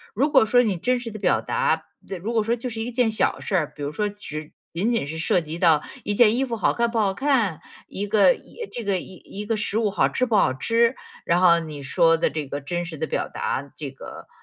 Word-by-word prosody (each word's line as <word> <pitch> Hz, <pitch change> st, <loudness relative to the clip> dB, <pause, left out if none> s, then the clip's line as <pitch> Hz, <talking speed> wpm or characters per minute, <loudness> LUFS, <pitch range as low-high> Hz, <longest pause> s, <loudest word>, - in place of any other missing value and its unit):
如 280 Hz, +7 st, +1 dB
果 270 Hz, -, +6 dB
说 245 Hz, +3 st, +4 dB
你 205 Hz, -6 st, 0 dB
真 250 Hz, +8 st, 0 dB
实 240 Hz, -2 st, -6 dB
的 215 Hz, -, -8 dB
表 -, -, +2 dB
达 480 Hz, 0 st, 0 dB, 0.4 s
如 225 Hz, +3 st, -2 dB
果 225 Hz, -2 st, +2 dB
说 230 Hz, +2 st, +1 dB
就 245 Hz, +1 st, -5 dB
是 225 Hz, -1 st, -5 dB
一 240 Hz, +2 st, -3 dB
件 240 Hz, -2 st, +2 dB
小 215 Hz, -, +1 dB
事 195 Hz, -, -2 dB
儿， 155 Hz, -5 st, 0 dB
比 145 Hz, -, -7 dB
如 145 Hz, -, -2 dB
说 210 Hz, +7 st, -1 dB
只 155 Hz, -7 st, -7 dB, 0.2 s
仅 195 Hz, +8 st, 0 dB
仅 230 Hz, -10 st, 0 dB
是 160 Hz, +2 st, -5 dB
涉 175 Hz, +2 st, +2 dB
及 160 Hz, +1 st, -7 dB
到 160 Hz, -4 st, +4 dB, 0.2 s
一 205 Hz, -, -1 dB
件 225 Hz, 0 st, +5 dB
衣 265 Hz, -, +2 dB
服 240 Hz, -3 st, -3 dB
好 210 Hz, -, +1 dB
看 235 Hz, 0 st, +1 dB
不 235 Hz, -, -2 dB
好 200 Hz, -3 st, +2 dB
看， 225 Hz, -, +1 dB, 0.3 s
一 205 Hz, +2 st, -4 dB
个 215 Hz, -, +5 dB, 0.4 s
这 240 Hz, -, -5 dB
个 200 Hz, -3 st, 0 dB
一 195 Hz, +3 st, -9 dB
个 225 Hz, 0 st, -1 dB
食 210 Hz, 0 st, -2 dB
物 215 Hz, -3 st, +1 dB
好 205 Hz, -, +2 dB
吃 255 Hz, -, 0 dB
不 230 Hz, -3 st, 0 dB
好 130 Hz, -10 st, +4 dB
吃， 230 Hz, -, +2 dB, 0.3 s
然 175 Hz, +1 st, +2 dB
后 170 Hz, -2 st, +6 dB
你 150 Hz, -3 st, -7 dB
说 165 Hz, +4 st, +3 dB
的 -, -, +1 dB
这 150 Hz, -2 st, -4 dB
个 145 Hz, +2 st, -5 dB
真 175 Hz, +5 st, -3 dB
实 165 Hz, -2 st, -7 dB
的 160 Hz, -, -2 dB
表 -, -, -2 dB
达 140 Hz, +1 st, -3 dB
这 145 Hz, -3 st, -5 dB
个 135 Hz, -, -11 dB
205 Hz, 270 characters per minute, -24 LUFS, 165-230 Hz, 0.4 s, 果